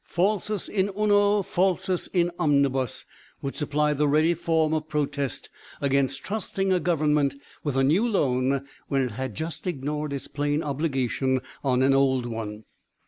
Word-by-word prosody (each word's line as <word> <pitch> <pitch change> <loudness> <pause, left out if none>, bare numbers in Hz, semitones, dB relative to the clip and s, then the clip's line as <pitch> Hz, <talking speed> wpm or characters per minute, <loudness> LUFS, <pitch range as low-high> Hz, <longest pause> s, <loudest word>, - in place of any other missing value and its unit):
"Falsus 205 +2 0
in 195 -1 0
uno, 205 -1 +3
falsus 185 0 0
in 175 -1 +1
omnibus 140 -5 +1 0.4
would 140 - -2
supply 150 0 0
the 150 +1 +1
ready 155 +4 +4
form 160 -2 +1
of 155 -1 -1
protest 145 -3 -2 0.3
against 135 -1 +1
trusting 195 -2 -1
a 180 - +3
Government 150 -5 +2 0.3
with 145 -3 -1
a 135 - +4
new 170 - +3
loan 135 - +1 0.2
when 135 -1 +1
it 125 - -2
had 125 0 -5
just 165 +3 -5
ignored 150 -1 -2
its 140 -1 -4
plain 145 +1 -1
obligation 135 -3 0 0.2
on 130 -2 +2
an 135 +1 +4
old 135 -2 +3
one. 110 -2 -5
150 Hz, 150 wpm, -26 LUFS, 135-175 Hz, 0.4 s, ready